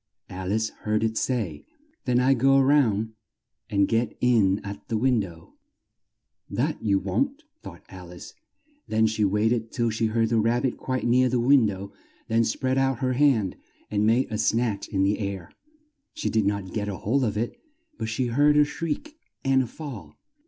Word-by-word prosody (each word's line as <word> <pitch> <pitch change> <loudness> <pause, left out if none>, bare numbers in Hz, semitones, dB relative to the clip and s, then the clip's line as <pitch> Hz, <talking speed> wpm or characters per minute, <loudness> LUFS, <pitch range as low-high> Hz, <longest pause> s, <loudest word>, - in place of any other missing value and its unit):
Al 95 +1 -4
ice 110 +1 0
heard 110 +1 0
it 110 0 0
say, 105 - -2 0.4
"Then 125 -2 +2
I'll 130 +2 +4
go 135 +2 +4
round 120 -6 +2 0.6
and 100 -1 +2
get 115 +1 0
in 110 -6 +3
at 100 0 -8
the 115 - -1
win 125 +1 +2
dow." 85 -5 -8 1.0
"That - - -1
you 100 -2 +2
won't!" 275 - -1 0.2
thought - - -11
Al - - -11
ice; - - -11 0.5
then 110 0 +2
she 110 -1 0
wait 105 +3 +2
ed 115 -2 -3
till 115 -2 0
she 110 +1 0
heard 115 0 +1
the 115 -1 +2
Rab 115 +3 +1
bit 130 - 0
quite 130 -1 -3
near 125 +2 +3
the 125 0 +1
win 125 -1 +5
dow, 100 0 -5 0.4
then 115 +1 +2
spread 130 +3 0
out 135 -1 +1
her 130 +1 0
hand 125 -8 +2 0.3
and 105 0 +1
made 115 +3 +2
a 110 - -2
snatch 110 -2 0
in 95 -2 0
the 100 +3 +1
air. 100 -4 -5 0.6
She 310 - -2
did 110 -3 +2
not 100 -2 -2
get 105 -2 -2
hold 110 +7 -1
of 105 -3 -1
it, 115 +2 -3 0.4
but 110 - -3
she 120 +3 -1
heard 145 +5 +3
a 150 - +6
shriek 165 - -5 0.3
and 135 0 +4
a 130 - -3
fall. 115 - -9
115 Hz, 190 wpm, -25 LUFS, 105-130 Hz, 1.0 s, a